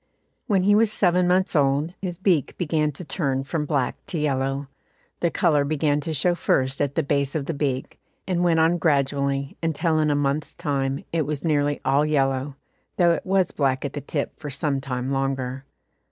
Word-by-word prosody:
When 195 -4 +2
he 205 +2 +4
was 215 0 +4
seven 180 -3 +2
months 185 0 +2
old, 145 +3 +2
his 180 -3 -4
beak 180 -6 +1
began 155 -3 0
to 170 +6 -8
turn 135 -5 -1
from 150 +1 -3
black 140 -5 -1
to 170 - -4
yellow. 135 -1 -1 0.5
The 170 - +2
colour 155 -4 +2
began 145 0 +1
to 160 +2 -4
show 160 +4 +2
first 135 -5 0
at 140 -1 -1
the - - +1
base 140 0 0
of 150 -3 -1
the 165 - -2
beak, 140 -3 -3 0.3
and 180 -2 -1
it - - +1
went 170 -2 +3
on 165 +2 +3
gradually, 140 -2 0
until 160 0 +1
in 155 -1 +2
a 145 - +2
month's 145 +1 -1
time 135 -2 -2
it 160 -4 0
was 150 +1 -3
nearly 145 -2 +1
all 140 +2 +3
yellow, 135 -2 0 0.4
though 175 -2 +5
it 170 - -2
was 190 -2 +2
black 135 -1 0
at 140 - -4
the 145 - -4
tip 145 0 -3
for 150 - -6
some 140 0 -1
time 130 -1 -3
longer. 135 -1 -2
145 Hz, 195 wpm, -24 LUFS, 135-165 Hz, 0.5 s, though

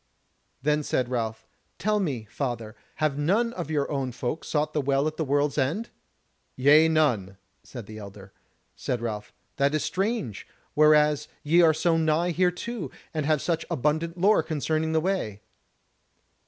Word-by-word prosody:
Then 150 +1 +2
said 130 -4 -1
Ralph: 115 -3 -2 0.3
"Tell 210 +2 +1
me, 135 - -2
father, 120 -5 -4 0.2
have 155 -2 0
none 215 +10 +1
of 175 -4 -5
your 145 -2 -1
own 135 -3 -1
folk 125 +5 -4
sought 155 0 -1
to 155 - +1
the - - +1
Well 140 +1 +1
at 155 0 -2
the 160 - -1
World's 145 +1 +1
End?" 160 - -1 0.7
"Nay, 150 +5 +6
none," 125 -12 +1 0.2
said 120 -5 -9
the 110 +1 -9
elder. 100 -1 -11 0.4
Said 125 - -2
Ralph: 110 -3 -4 0.3
"That 140 +2 +2
is 155 - 0
strange, 190 - -2 0.3
whereas 150 -1 +4 0.2
ye 165 +4 +4
are 165 -2 +6
so 165 +1 +2
nigh 165 +2 +1
thereto, 180 +4 -1 0.2
and 155 -2 -1
have 155 -2 +2
such 165 -2 0
abundant 160 +5 0
lore 200 +5 +4
concerning 160 +1 -1
the 160 - +2
way." 165 - -2
150 Hz, 160 wpm, -26 LUFS, 130-165 Hz, 0.7 s, Nay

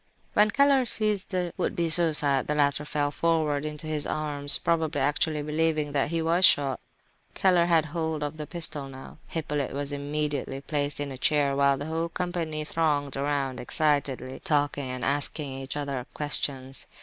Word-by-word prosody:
When 210 +1 +4
Keller 275 +2 +4
seized 215 -4 0
the 180 -3 -2
would - - -1
be 170 -1 0
suicide, 150 -5 +3
the 150 - 0
latter 145 0 +1
fell 145 -1 -1
forward 155 -3 0
into 150 0 -5
his 155 -2 -2
arms, 145 -2 +1
probably 160 -3 0
actually 150 +2 0
believing 155 0 0
that 140 0 0
he 165 0 -1
was 170 +3 +1
shot. 140 -7 +5 0.6
Keller 180 -3 +3
had 165 -2 +3
hold 160 -1 -3
of 150 +2 -4
the 150 -1 -6
pistol 155 -5 -2
now. 130 0 -11
Hippolyte 150 -4 -3
was 140 +1 -3
immediately 145 -1 -2
placed 145 0 -2
in 145 -1 -3
a 130 - -8
chair, 145 -2 +2
while 140 0 +3
the 145 - -5
whole 165 +2 -2
company 165 -3 -3
thronged 150 -3 -1
around 140 -2 -1
excitedly, 135 -2 0
talking 145 -3 0
and 125 -1 -4
asking 145 0 +3
each 135 +2 -6
other 140 -3 -4
questions. 135 -2 -1
150 Hz, 170 wpm, -26 LUFS, 140-160 Hz, 0.6 s, shot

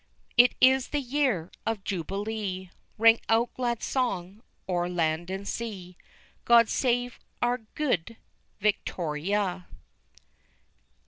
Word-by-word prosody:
_It 245 0 +7
is 260 0 +5
the 295 - -1
YEAR 255 - 0
of 225 -3 -2
JUBILEE! 195 0 -4 0.3
Ring 225 +1 +6
out 230 +2 +2
glad 240 -2 -2
song 200 -6 -2 0.3
o'er 175 -1 0
land 170 0 -1
and 195 +1 -5
sea; 195 -6 -5 0.5
God 235 -1 +6
save 245 -1 0 0.2
our 245 +1 +1 0.2
Good 230 - -1 0.4
Victoria! 185 -1 -1
210 Hz, 105 wpm, -27 LUFS, 180-240 Hz, 0.5 s, It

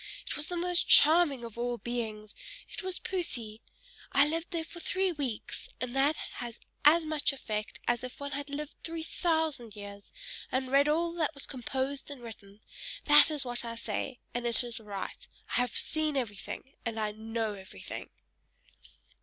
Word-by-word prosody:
"It - - -3
was 300 - 0
the 355 - -3
most 350 0 +1
charming 300 -5 +7
of 230 0 -8
all 240 0 0
beings, 220 -3 -3 0.4
it - - -5
was 375 -1 -1
Poesy! 235 - -2 0.5
I 280 +1 +6
was 330 +2 -1
there 335 -2 -1
for 335 +2 -10
three 375 +2 +1
weeks, 275 -9 -3
and 250 0 -3
that 280 +3 +4 0.2
has 235 -2 -6 0.2
as 315 +3 +7
much 310 -2 +2
effect 215 -6 -4
as 240 0 +2
if 255 - -7
one 285 0 -4
had 285 +1 -4
lived 295 +1 -4
three 330 -1 -2
thousand 315 - 0
years, 200 -1 -9 0.4
and 260 0 0
read 280 +2 +5
all 335 +2 +2
that 320 -3 0
was 280 - -5
composed 265 +2 -2
and 275 -4 -8
written; 210 -2 -11 0.4
that 295 +1 +8
is 295 -3 -2
what 245 -1 -1
I 230 -1 -4
say, 235 +2 -2 0.2
and 240 0 -1
it 235 +1 +2
is 240 -2 -5
right. 210 - -6 0.2
I - - 0
have 245 -2 +1
seen 310 -2 +2
everything 240 +3 -4
and 230 -1 -2
I 215 -1 0
know 220 0 -2
everything!" 190 - -8
265 Hz, 175 wpm, -31 LUFS, 230-310 Hz, 0.5 s, that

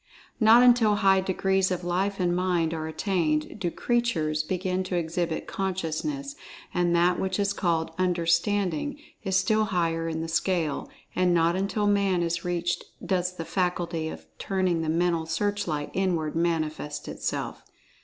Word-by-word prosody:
Not 230 +2 +7
until 240 -4 +5
very 205 - -3
high 190 -1 +5
degrees 190 0 +1
of 180 -1 -2
Life 190 +3 -1
and 175 -1 +1
Mind 175 -3 +1
are 160 -1 -3
attained, 160 -1 -1
do 175 - 0
"creatures" 170 -10 0
begin 185 +3 -2
to 185 - -3
exhibit 170 -1 -1
Consciousness, 195 - -3 0.4
and 175 -1 +2
that 175 +1 +3
which 190 -1 -1
is 200 0 +1
called 165 -4 0
"Understanding" 180 - +1 0.3
is 190 -2 +1
still 215 +3 +2
higher 165 -4 0
in 160 0 -3
the 165 - -3
scale, 165 -2 -1 0.3
and 180 -1 +3
not 170 +1 +3
until 200 +2 0
Man 200 -3 +2
is 170 0 -1
reached 175 0 -1 0.2
does 180 -1 0
the 165 - -5
faculty 175 -3 -1
of 80 - -9
turning 185 -3 0
the 160 - -2
mental 165 0 +1
searchlight 165 -4 -1
inward 170 -5 0
manifest 155 -3 -1
itself. - - -4
180 Hz, 155 wpm, -26 LUFS, 165-195 Hz, 0.4 s, Not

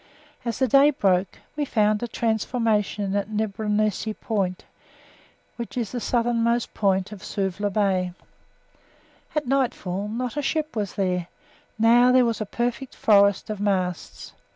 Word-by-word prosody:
As 235 -2 -3
the 260 - +2
day 275 +4 +6
broke, 190 -8 +1 0.2
we 295 - -1
found 215 -5 +1
a 240 - -2
transformation 220 -3 0
at 200 +1 -1
Nibronesi 215 0 -1
Point, 195 -5 -2 0.9
which 235 +1 -6
is 230 -5 -2
the 250 - -3
southernmost 235 0 0
part 195 -1 +1
of 205 -3 -9
Suvla 200 +1 -2
Bay. 190 -3 +1 1.2
At 300 -1 0
nightfall 235 -8 -1
not 245 +5 -4
a - - +1
ship 310 +1 -2
was 205 -4 -3
there; 180 -3 -1 0.5
now 240 +3 +5
there 255 -1 +5
was 230 -1 -1
a 215 - -3
perfect 245 +4 -3
forest 200 0 +3
of 210 - -5
masts. 185 -4 -2
215 Hz, 140 wpm, -24 LUFS, 200-240 Hz, 1.2 s, day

